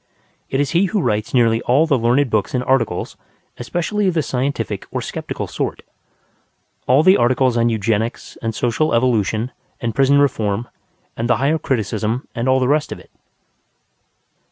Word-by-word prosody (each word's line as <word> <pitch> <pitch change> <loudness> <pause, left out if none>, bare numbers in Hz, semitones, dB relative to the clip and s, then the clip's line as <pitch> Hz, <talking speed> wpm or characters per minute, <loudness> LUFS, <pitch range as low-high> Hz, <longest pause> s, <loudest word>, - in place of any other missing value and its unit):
It 135 - -1
is 145 - 0
he 175 +3 +3
who 205 +2 -1
writes 105 - -1
nearly 115 -2 +3
all 135 +6 +3
the 155 -4 +2
learned 125 +2 +2
books 110 +3 0
and 125 - 0
articles, 125 -9 0 0.4
especially 175 - -1
of 180 - 0
the 160 - +1
scientific 135 +2 -3
or - - -3
skeptical - - -5
sort; - - -4 1.0
all 130 +5 +5
the 185 +3 +6
articles 125 +1 +2
on 120 0 +2
Eugenics 110 +1 -2
and 115 -1 -3
Social 125 +4 0
Evolution 115 -1 +1 0.3
and 115 -1 -2
Prison 135 +3 +3
Reform 115 -5 +1 0.5
and 115 +1 -3
the 125 - +3
Higher 145 +5 +1
Criticism 110 -1 -2
and 120 +3 -1
all 130 0 +4
the 130 - +1
rest 150 +2 +1
of - - -5
it. - - -17
125 Hz, 165 wpm, -19 LUFS, 115-140 Hz, 1.0 s, the